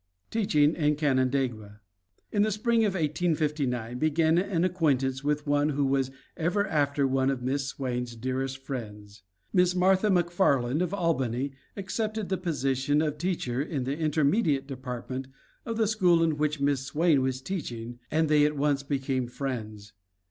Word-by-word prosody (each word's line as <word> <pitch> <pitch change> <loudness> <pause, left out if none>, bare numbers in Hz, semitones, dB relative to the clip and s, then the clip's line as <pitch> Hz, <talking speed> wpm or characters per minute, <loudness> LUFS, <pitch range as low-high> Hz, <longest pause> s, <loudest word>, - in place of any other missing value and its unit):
TEACHING 155 -9 +3
IN 150 -2 +1
CANANDAIGUA 130 -7 0 0.5
In 205 - +2
the 215 +1 +2
spring 225 +2 +2
of 200 - 0
1859 150 -7 -1
began 160 +2 +3
an 180 -3 0
acquaintance 140 -7 +1
with 150 0 0
one 145 0 +2
who 145 -1 0
was 135 -1 +1 0.3
ever 180 +5 0
after 145 -5 +1
one 135 0 +1
of 130 -2 -2
Miss 135 +2 -1
Swain's 125 -3 -3
dearest 130 +3 -3
friends. 105 -6 -8 0.3
Miss 180 -1 +3
Martha 190 +3 +3
McFarland 175 -7 +2
of 180 -1 -1
Albany 140 - 0 0.3
accepted 215 +1 -3
the 190 - 0
position 140 -4 0
of 150 -1 -1
teacher 150 -8 -1
in 145 -3 -2
the 135 +3 -2
intermediate 155 -1 +1
department 130 -1 -6 0.4
of 230 -1 -2
the 225 - +3
school 180 -6 +3
in 160 -2 +1
which 150 0 -1
Miss 140 -1 +1
Swain 150 +1 +2
was 130 -1 -1
teaching 120 -8 -5
and 160 +1 +2
they 150 -1 +4
at 150 0 +1
once 140 -1 +1
became 135 -2 -2
friends. 110 -6 -5
145 Hz, 155 wpm, -28 LUFS, 130-170 Hz, 0.5 s, they